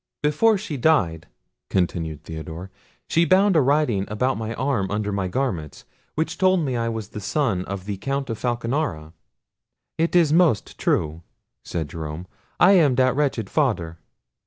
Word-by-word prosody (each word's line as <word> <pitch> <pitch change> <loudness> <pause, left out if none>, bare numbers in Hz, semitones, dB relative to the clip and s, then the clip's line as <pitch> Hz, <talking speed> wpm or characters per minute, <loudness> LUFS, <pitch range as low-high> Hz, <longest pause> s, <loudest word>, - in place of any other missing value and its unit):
"Before 200 +9 +3
she 175 -7 -5
died," 95 - +2 0.4
continued 80 -4 -1
Theodore, 80 +4 -7 0.4
"she 165 - +3
bound 190 +2 +4
a 155 - +6
writing 135 -8 +2
about 125 +5 0
my 110 0 -4
arm 125 -7 -1
under 105 0 -2
my 100 -2 -1
garments, 90 - -3 0.3
which 160 +2 -2
told 185 -1 +4
me 135 -5 -1
I 115 -1 0
was 110 -2 -5
the - - -7
son 105 -3 0
of 100 -1 -6
the 100 -1 -4
Count 135 +7 -2
Falconara." 115 - -2 0.9
"It 165 +2 +1
is 165 -4 +5
most 165 - +2
true," 80 +2 0 0.4
said 80 -3 -3
Jerome; 80 +3 -6 0.3
"I 180 - +7
am 155 -9 +5
that 130 0 +3
wretched 135 -7 0
father." 95 - -1
115 Hz, 155 wpm, -23 LUFS, 90-150 Hz, 0.9 s, I